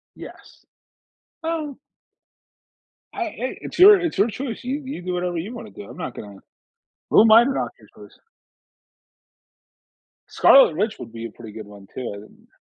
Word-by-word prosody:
Yes. - - -14 0.8
Oh 320 -4 -4 1.4
I - - -6
i 320 - -8 0.3
it's - - -8
your 400 +2 +9
it's 340 - -3
your 200 +3 +3
choice. 240 +1 -6
You 270 +4 -3
you 265 -8 -6
do 180 0 -3
whatever 180 -1 -2
you 190 +9 -5
wanna 230 -2 -9
do. 205 - -11
I'm - - -12
not 160 -8 -6
gonna 100 -2 -10 0.7
who - - +6
am 220 0 +5
I 225 +2 +8
to 255 - -1
knock 275 - -2
your - - -19 0.2
choice? - - -20 2.1
Scarlet 265 - +5
Witch 215 +3 -1
would - - -9
be 115 0 -7
a 115 - -7
pretty 110 -1 -12
good 105 0 -10
one 100 -1 -14
too, 130 -2 -5
I - - -9
didn't 105 - -18
210 Hz, 175 wpm, -22 LUFS, -, 2.1 s, your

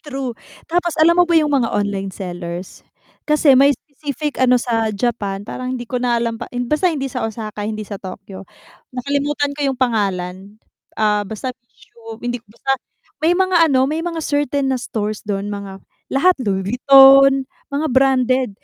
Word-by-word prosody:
true. 270 -4 -4 0.4
Tapos 345 -1 0
alam 340 +2 +5
mo 355 - +7
ba 340 - +1
yung 305 -2 +3
mga 265 -5 +2
online 200 -2 -2
sellers, 175 -1 -7 0.4
kasi 300 -2 +4
may 280 +1 +5
specific 295 0 -6
ano 250 -1 +5
sa 230 -2 0
Japan 205 -3 -2
parang 255 +3 -5
hindi 240 - -6
ko 250 - -2
na 240 -1 +1
alam 230 -1 -1
pa - - -6 0.2
basta 305 +7 +2
hindi 290 -5 -2
sa 250 - -4
Osaka, 215 -2 -6
hindi 215 -1 -4
sa 200 -1 -7
Tokyo 195 0 -9 0.5
nakalimutan 285 +2 -1
ko 295 - -9
yung 260 - -4
pangalan, 195 -4 -2 0.4
ah, 210 -1 +2
basta 250 +4 -5 0.7
hindi 245 -1 -2
basta, 235 +5 -2 0.5
may 330 +2 +4
mga 365 -4 +3
ano, 260 -1 +3
may 310 +3 -2
mga 335 -2 -3
certain 285 -2 0
na 255 - -1
stores 215 -3 -3
dun 200 0 -3
mga 195 -1 -7 0.3
lahat 360 +7 +4
Louis 190 -4 -1
Vuitton 270 +3 +7 0.3
mga 290 +3 -1
branded, 260 -1 +2
250 Hz, 165 wpm, -19 LUFS, 210-285 Hz, 0.7 s, mo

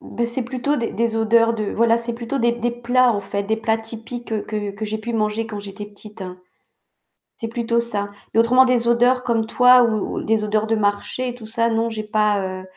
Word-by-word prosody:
Bah, 235 - -3
c'est 235 +2 -3
plutôt 255 +4 -1
des 235 -3 -2
des 230 0 0
odeurs 230 +1 +3
de 215 -2 -2
voilà, 230 0 +3
c'est 235 0 -5
plutôt 235 +3 -4
des 235 0 +2
des 240 0 -1
plats 240 +1 +2
en 205 - -2
fait, 200 0 -4
des 220 +2 0
plats 225 0 0
typiques 225 0 -6
que 210 -1 -3
que 200 +2 -6
j'ai 215 +1 -3
pu 235 +2 -5
manger 215 0 -1
quand 210 -2 -6
j'étais 200 +1 -8
petite. 210 0 -13 1.2
C'est 225 - -4
plutôt 235 0 -1
ça. 205 -4 -3 0.2
Mais 225 - +3
autrement 250 +3 +6
des 245 -2 +1
odeurs 245 +2 +3
comme 230 -2 0
toi 250 +1 +6
ou 220 -3 -1
des 220 -1 +1
odeurs 215 +1 0
de 225 - +1
marché 210 +4 -1
et 245 - -6
tout 225 -3 -11
ça, 230 +1 0
non 225 0 0
j'ai 220 -1 -5
pas, 210 -2 +1
heu, 185 0 -5
225 Hz, 220 wpm, -21 LUFS, 215-235 Hz, 1.2 s, autrement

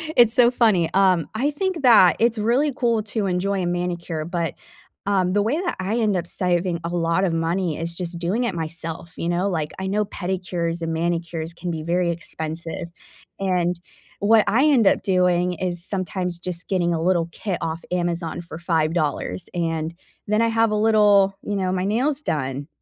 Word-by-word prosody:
it's 235 -2 +6
so 240 -1 +5
funny, 215 -9 +3
um, 185 -5 +3
I 265 +7 0
think 365 +2 -2
that 225 -9 +7
it's 230 0 +2
really 245 +8 +2
cool 235 -5 +1
to 210 0 -2
enjoy 190 +1 0
a - - -1
manicure, 175 -2 -2
but, 170 -1 -2 0.5
um, 185 -2 +2
the 205 - +3
way 235 +10 0
that 360 -1 -2
I 195 +5 -1
end 215 -3 +2
up 175 -1 -2
saving 175 -1 0
a 170 - -3
lotta 175 +2 +1
money 165 0 -1
is 170 +1 -4
just 175 -1 -5
doing 185 +8 0
it 235 - -1
myself, 165 0 -6
you 170 - -3
know, 180 +3 +1
like, 160 -4 -2
I 190 - -3
know 210 +2 +1
pedicures 175 -3 -3
and 165 0 -2
manicures 165 0 -2
can 175 +1 -5
be 160 -2 -4
very 175 +1 +1
expensive, 165 +1 -5 0.5
and 180 -2 0 0.4
what 215 +1 +5
I 255 +7 +3
end 270 -8 +4
up - - +4
doing 180 -1 +2
is 175 0 -3
sometimes 185 -2 -3
just 175 0 -3
getting 175 -3 +1
a 160 - -1
little 170 -1 +1
kit 190 +1 -3
off 165 +1 -3
Amazon 175 -2 -2
for 170 -2 -9
$5, 155 - -1
and 165 -2 -2 0.3
then 215 +2 +2
I 230 - +3
have 225 0 +2
a - - +1
little 210 -2 +4
you 205 - -3
know, 185 -2 0
my 185 0 -1
nails 265 +8 +1
done, 140 - -3
180 Hz, 185 wpm, -23 LUFS, 170-205 Hz, 0.5 s, that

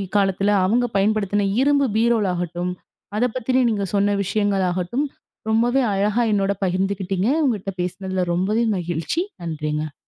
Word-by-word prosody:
காலத்துல 195 0 +2
அவுங்க 240 +6 +2
பயன்படுத்தின 205 -1 +1
இரும்பு 280 -1 +3
பீரோல் 230 -2 +2
ஆகட்டும் 175 +1 -3 0.5
அதப் 245 0 +1
பத்தின 255 +1 +1
நீங்கச் 200 -3 -2
சொன்ன 200 0 +2
விஷயங்கள் 200 -1 0
ஆகட்டும் 185 +11 -1 0.4
ரொம்பவே 240 +4 +3
அழகா 210 +4 +1
என்னோட 200 -1 +2
பகிர்ந்துக்கிட்டீங்க. 190 +1 -1 0.2
உங்கட்ட 205 -6 -1
பேசினதுல 185 +1 -2
ரொம்பவே 210 +6 +1
மகிழ்ச்சி. 175 - -2 0.2
நன்றிங்க. 150 -2 -3
200 Hz, 125 wpm, -22 LUFS, 180-220 Hz, 0.5 s, இரும்பு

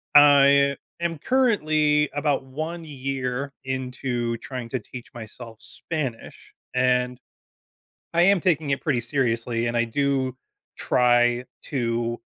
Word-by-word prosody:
I 140 -1 +6 0.2
am 170 -2 -2
currently 155 - +2
about 145 -2 0
1 155 +6 -5
year 135 -1 -3
into 125 -2 -2
trying 130 -1 -6
to 130 - -2
teach 120 +3 -11
myself 115 0 -10
Spanish, 135 -8 -6 0.2
and, 125 0 +1 0.9
I 170 - +3
am 195 +1 +5
taking 160 -5 +1
it 135 - -1
pretty 140 -7 0
seriously, 115 -2 -1
and 120 - -2
I 120 - +3
do 130 +1 0 0.4
try 120 0 +3 0.2
to, 120 -3 -2
130 Hz, 115 wpm, -24 LUFS, 120-145 Hz, 0.9 s, I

